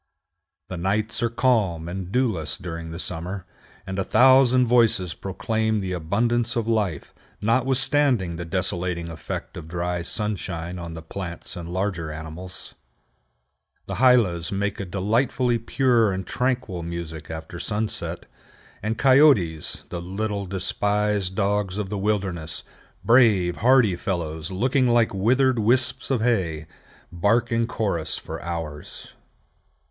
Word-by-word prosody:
The 90 - -6
nights 105 +7 -1
are 115 - +2
calm 110 -9 +1
and 90 +1 -5
dewless 95 - 0
during 85 -2 -6
the 80 - -6
summer, 90 +2 -4 0.4
and 95 0 -4
a - - +1
thousand 130 +2 +5
voices 115 -8 +3
proclaim 110 +3 -1
the 95 -2 -3
abundance 115 +8 0
of 115 -2 -1
life, 105 -9 -1 0.3
notwithstanding 130 -3 +2
the 85 - -5
desolating 85 0 -2
effect 80 - -6
of 80 -2 -8
dry 90 +1 -2
sunshine 90 -3 -4
on 85 -1 -7
the 80 - -8
plants 85 +1 -6
and 85 -1 -7
larger 90 -4 -2
animals. 80 +4 -7 1.1
The - - -5
hylas 110 -10 +4
make 100 +1 -2
a 100 - -3
delightfully 115 +6 +1
pure 115 -2 +2
and 95 0 -3
tranquil 125 -8 -1
music 85 -2 -6
after 80 +2 -7
sunset; 105 +3 -2 0.6
and 110 +2 -2
coyotes, 130 - +4
the 85 - -5
little, 100 +2 -3
despised 100 +1 0
dogs 100 -1 0
of 105 -2 -3
the 105 - -2
wilderness, 95 -7 -2 0.4
brave, 110 -8 +4
hardy 120 -5 +4
fellows, 80 -4 -3
looking 130 +7 +2
like 120 -2 +3
withered 125 +6 +2
wisps 125 +3 +2
of 130 -5 +1
hay, 90 -10 0 0.5
bark 110 +7 +1
in 115 0 +1
chorus 100 -9 -1
for - - -7
hours. 80 -4 -6
100 Hz, 130 wpm, -24 LUFS, 85-115 Hz, 1.1 s, thousand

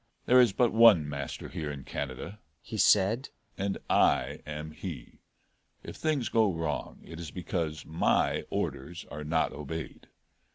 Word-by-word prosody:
"There 125 +1 +7
is 120 - +4
but 120 +4 +2
one 110 -9 +7
master 70 -1 -5
here 80 -4 -5
in 70 -2 -6
Canada," 70 +12 -5 0.2
he 110 - -8
said, 110 +5 +3 0.3
"and 100 0 -2
I - - +3
am 75 +1 -5
he. - - -8 0.6
If - - -8
things 150 -6 0
go 110 -3 +3
wrong 80 -3 -4
it 80 - -9
is 85 -3 -6
because 80 -2 -3
my 80 +1 +1
orders 85 +6 -4
are 75 +1 -6
not 80 +2 0
obeyed. 75 +2 -7
85 Hz, 150 wpm, -29 LUFS, 75-105 Hz, 0.6 s, There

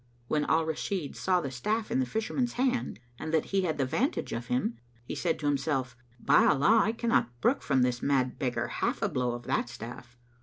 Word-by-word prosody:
When 150 +1 +1
Al 160 0 +2
Rashid 160 0 -3
saw 185 -1 +1
the 140 -5 -4
staff 210 - -2
in - - +2
the 130 - +1
Fisherman's 230 - -1
hand 250 - 0 0.2
and 155 - -4
that 160 -2 +2
he 195 - +4
had 165 -4 -1
the 135 - +1
vantage 260 - -1
of 120 +1 -4
him, 125 -2 -1 0.3
he - - -5
said 170 -3 0
to 150 - -6
himself, 135 -3 0 0.2
"By - - +5
Allah, 200 +11 +5
I 220 - +2
cannot 230 - 0
brook - - +2
from 135 -2 +2
this 125 -1 0
mad 130 -3 +1
beggar 125 -3 -1
half - - -2
a - - +2
blow 125 -1 -1
of 120 0 -6
that 120 - -1
staff!" 120 +1 -9
140 Hz, 215 wpm, -29 LUFS, 125-190 Hz, 0.3 s, By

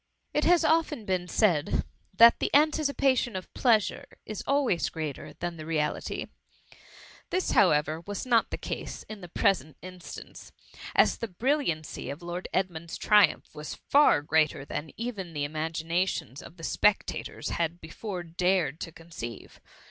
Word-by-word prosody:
It 300 - +1
has 345 -2 +5
often 315 -8 +1
been 185 -2 -1
said 175 -8 +2 0.3
that 230 +4 +7
the - - 0
anticipation 280 -5 +2
of 185 - -6
pleasure 225 -5 +2 0.2
is 215 -2 -5
always 275 - +2
greater 155 -4 -5
than 175 -1 -5
the 155 - -8
reality: 155 -2 -1 1.0
this, 370 +1 0
however, 155 -4 +3
was 205 +3 -4
not 235 -3 +3
the - - -4
case - - -5
in 215 -2 -9
the 175 - -9
present 155 -4 +1
instance, 185 -1 -10 0.4
as - - +4
the 230 - -3
brilliancy 210 - -1
of 145 +5 -7
Lord 175 +1 -5
Edmund^s 170 -3 -2
triumph 210 -2 +3
was 150 0 -6
far 285 - +4
greater 155 -2 +1
than 145 +2 -5
even 210 -7 -5
the 145 -1 -1
imagina. 165 +4 -1
tions 140 -4 -5
of 170 - -13
the 165 - -12
spectators 210 +4 0
had 170 0 -1
before 180 +3 -6
dared 170 -2 0
to 165 - -6
conceive. 160 -9 -9
180 Hz, 150 wpm, -28 LUFS, 160-220 Hz, 1.0 s, that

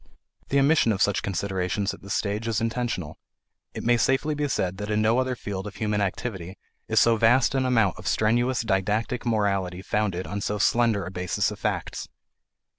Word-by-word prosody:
The 140 - +2
omission 140 -4 +4
of 100 - -1
such 100 - +2
considerations 95 +1 -2
at - - -12
this 100 0 -3
stage 105 +2 -2
is 115 -1 0
intentional. 115 -9 -3 0.6
It - - -5
may 120 0 +3
safely 135 +5 +1
be 150 0 -1
said 95 -8 -1
that 105 +1 -5
in 105 0 +1
no 110 +3 +3
other 130 0 0
field 100 -3 -5
of 100 - -9
human 105 -2 -1
activity 95 -2 -4 0.3
is - - +3
so 115 -1 +4
vast 120 +4 +4
an 130 -1 +1
amount 115 -8 +2
of 90 - -7
strenuous 120 +7 +2
didactic 110 +4 -1
morality 100 -5 0
founded 100 -4 -1
on 100 +1 -4
so 105 +1 -2
slender 115 -1 +2
a 90 - -6
basis 90 -1 -1
of - - -8
facts. - - -3
105 Hz, 190 wpm, -25 LUFS, 95-120 Hz, 0.6 s, omission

